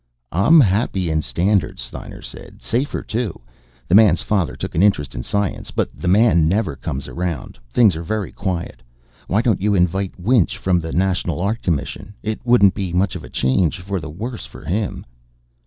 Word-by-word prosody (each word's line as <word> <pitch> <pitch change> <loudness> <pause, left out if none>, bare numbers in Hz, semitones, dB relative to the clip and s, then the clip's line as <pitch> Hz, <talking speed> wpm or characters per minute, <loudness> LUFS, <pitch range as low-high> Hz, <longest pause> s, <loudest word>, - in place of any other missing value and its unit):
"I'm 125 - +5
happy 95 - +1
in 80 0 +1
Standards," 85 - 0
Steiner - - -9
said. - - -11
"Safer, 125 +6 -1
too. 110 -5 -3 0.5
The - - -1
Man's 100 -4 +6
father 95 -6 0
took - - -6
an 80 - +1
interest 100 -8 +2
in - - -4
science, 100 +8 -2
but - - -1
The 90 - -6
Man 95 -4 +4
never 90 -4 0
comes 70 +1 -5
around. 85 -7 -4
Things 105 - +4
are 80 - -4
very 100 +3 -3
quiet. 90 -4 -4 0.5
Why 105 +5 +1
don't 115 -7 +1
you 105 0 +2
invite 95 +1 0
Winch, 110 +1 +2
from 90 -2 +1
the 80 -1 -5
National 90 -1 0
Art 105 +6 -1
Commission? 85 +5 -3
It 110 0 -3
wouldn't 120 -6 +5
be 95 -4 -4
much 95 +1 +1
of - - -6
a - - -10
change 75 +7 +1
for 95 +1 -3
the 80 - -7
worse 110 +10 -6
for - - -13
him." 100 +3 -2
95 Hz, 185 wpm, -20 LUFS, 85-105 Hz, 0.5 s, Man's